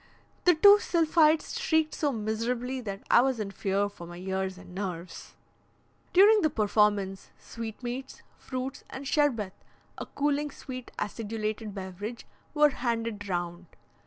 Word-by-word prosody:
The 355 -1 +6
two 405 +6 +8
sylphides 325 +2 +2
shrieked 320 -9 +2
so 295 -2 0
miserably 235 +3 -2
that 200 -4 -6
I - - +8
was 260 -2 0
in 200 -2 -3
fear 195 +1 0
for 175 -4 -10
my 175 0 -9
ears 190 0 -3
and 185 -1 -13
nerves. 180 -3 -6 0.8
During 415 +4 +7
the 310 - +3
performance, 210 -5 +1
sweetmeats, 240 +3 -7
fruits, 255 0 -5
and 270 +1 -7
sherbet 245 -11 +1 0.5
(a - - -5
cooling, 290 +1 0
sweet, 255 -3 -8
acidulated 215 0 -4
beverage) 195 +4 -6 0.3
were 300 0 +6
handed 230 -5 -3
round. 175 0 -3
230 Hz, 130 wpm, -28 LUFS, 195-280 Hz, 0.8 s, two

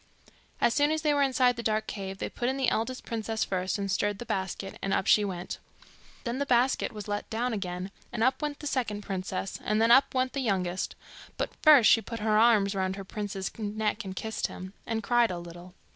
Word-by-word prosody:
As 235 - +3
soon 290 0 +3
as 315 0 -1
they 300 -1 +3
were 285 - +2
inside 255 -3 +3
the - - -3
dark 215 -1 0
cave, 195 -1 -5
they - - -3
put 240 - -2
in 265 - -1
the 265 -2 +2
eldest 250 +4 -2
princess 225 -1 -2
first, 185 +1 -1
and 200 -1 -2
stirred 205 +1 0
the 240 - -7
basket, 195 -2 -4
and 195 - -1
up - - 0
she 210 - +5
went. 180 -3 -4 0.6
Then 240 +1 -3
the 280 - 0
basket 250 +1 +2
was 210 -2 -8
let 205 0 -3
down 235 +2 -1
again, 185 -2 -4 0.2
and 235 -2 -1
up 260 +4 +2
went 295 -1 -3
the - - -7
second 240 -7 -1
princess, 190 0 -4
and 215 +1 +1
then 225 +1 +4
up 265 +2 +5
went 255 0 +1
the 275 - -2
youngest; 190 -7 -1 0.4
but - - -2
first 295 -7 +8
she 225 - +6
put 230 0 -6
her 215 0 +2
arms 215 -3 +4
round 190 -1 -1
her 195 -1 -7
prince's 200 -1 -4
neck, 215 +1 -1
and 190 -1 -6
kissed 220 +4 -2
him, 185 +1 -9
and 225 -1 -2
cried 240 +1 +3
a 180 - -3
little. 175 +1 -10
215 Hz, 225 wpm, -28 LUFS, 195-245 Hz, 0.6 s, first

